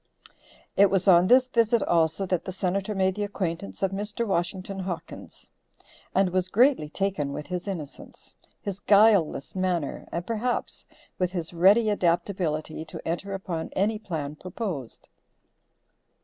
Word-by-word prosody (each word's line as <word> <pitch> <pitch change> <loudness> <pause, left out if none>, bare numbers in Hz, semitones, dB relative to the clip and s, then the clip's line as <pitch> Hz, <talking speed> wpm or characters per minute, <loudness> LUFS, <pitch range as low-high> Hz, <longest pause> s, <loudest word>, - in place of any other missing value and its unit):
It 200 0 +6
was 195 0 +1
on 180 -1 +7
this 255 +3 +6
visit 230 -3 +2
also 165 +3 +1
that 180 -2 -1
the 185 - -5
Senator 195 +2 -2
made 190 -1 +2
the 205 +2 -3
acquaintance 170 - -4
of 190 - +2
Mr. 210 +4 -2
Washington 190 0 -2
Hawkins, 175 -3 -7 0.6
and 190 -1 +3
was 185 0 0
greatly 240 - +3
taken 160 -6 -2
with 150 - -5
his 180 +2 -5
innocence, 165 -8 -8 0.3
his 200 -1 -5
guileless 200 -9 +4
manner 180 -5 -2
and 170 +1 -3
perhaps 230 +3 -2 0.3
with 180 0 0
his 170 -2 -3
ready 195 +7 +5
adaptability 170 -4 -1
to 155 - -9
enter 185 +4 -3
upon 175 -4 -4
any 210 +3 0
plan 155 -8 -4
proposed. 175 - -6
185 Hz, 140 wpm, -26 LUFS, 170-200 Hz, 0.6 s, on